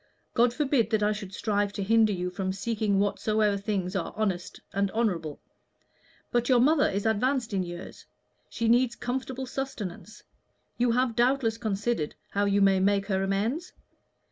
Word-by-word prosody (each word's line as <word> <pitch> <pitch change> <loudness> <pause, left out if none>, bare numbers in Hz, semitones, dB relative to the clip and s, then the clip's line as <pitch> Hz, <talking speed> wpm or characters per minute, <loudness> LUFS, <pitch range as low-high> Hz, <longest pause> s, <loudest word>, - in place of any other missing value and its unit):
God 240 0 +4
forbid 265 -4 +1
that 220 -2 +1
I 210 - +3
should 205 -3 -5
strive 205 0 0
to 200 - -3
hinder 220 +1 +4
you 180 -2 -2
from 190 0 -2
seeking 210 0 0
whatsoever 210 +1 +1
things 195 -2 -2
are 185 - -3
honest 190 -5 -2
and 200 0 +1
honorable. 175 -10 -1 0.9
But 240 +1 +1
your 250 -2 +5
mother 295 +4 +4
is 200 +2 -2
advanced 230 +2 +1
in 195 - +1
years; 175 -1 -8 0.4
she 230 - -2
needs 240 +1 +3
comfortable 260 +1 -4
sustenance; 220 -6 -6 0.6
you 245 0 +3
have 245 0 +1
doubtless 240 -2 +2
considered 210 -6 -1 0.2
how 205 +1 +1
you 200 0 +3
may 195 -1 +4
make 200 +1 +2
her 190 -2 0
amends? 215 - -1
215 Hz, 160 wpm, -27 LUFS, 195-240 Hz, 0.9 s, your